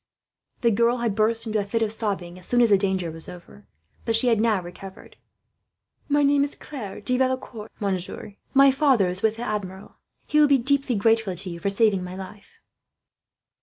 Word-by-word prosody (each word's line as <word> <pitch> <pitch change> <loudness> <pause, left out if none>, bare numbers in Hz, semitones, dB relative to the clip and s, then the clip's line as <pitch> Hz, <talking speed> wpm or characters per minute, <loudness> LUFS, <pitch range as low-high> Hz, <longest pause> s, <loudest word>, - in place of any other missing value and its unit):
The 235 - +3
girl 235 +3 +2
had 235 -3 -1
burst 225 +2 +1
into 215 -1 -1
a - - -1
fit 225 +3 -1
of 215 - -1
sobbing, 195 -5 -4
as 180 - -9
soon 245 - +1
as 235 -3 +4
the 200 - +7
danger 190 -4 -1
was 165 0 -6
over; 180 +3 -13 0.4
but 230 -2 +1
she 245 +2 +3
had 225 -2 +2
now 220 -3 +2
recovered. 180 +2 -11 0.9
"My 290 0 +3
name 280 0 +3
is 285 - -3
Claire 225 -10 -8
de 250 0 -1
Valecourt, 255 -4 -2
monsieur," 190 -3 -3
she - - -16
said. 200 - -33
"My 275 0 +7
father 265 -9 +2
is 180 +2 -1
with 220 0 +1
the 230 - -6
Admiral. 200 -4 -5 0.3
He 300 - +1
will 300 - +6
be 280 -1 +4
deeply 270 0 +1
grateful 225 -2 +1
to 185 +2 -7
you 170 - -7
for 200 - -1
saving 200 -2 +2
my 180 0 -7
life." 195 +1 -11
215 Hz, 205 wpm, -24 LUFS, 190-245 Hz, 0.9 s, the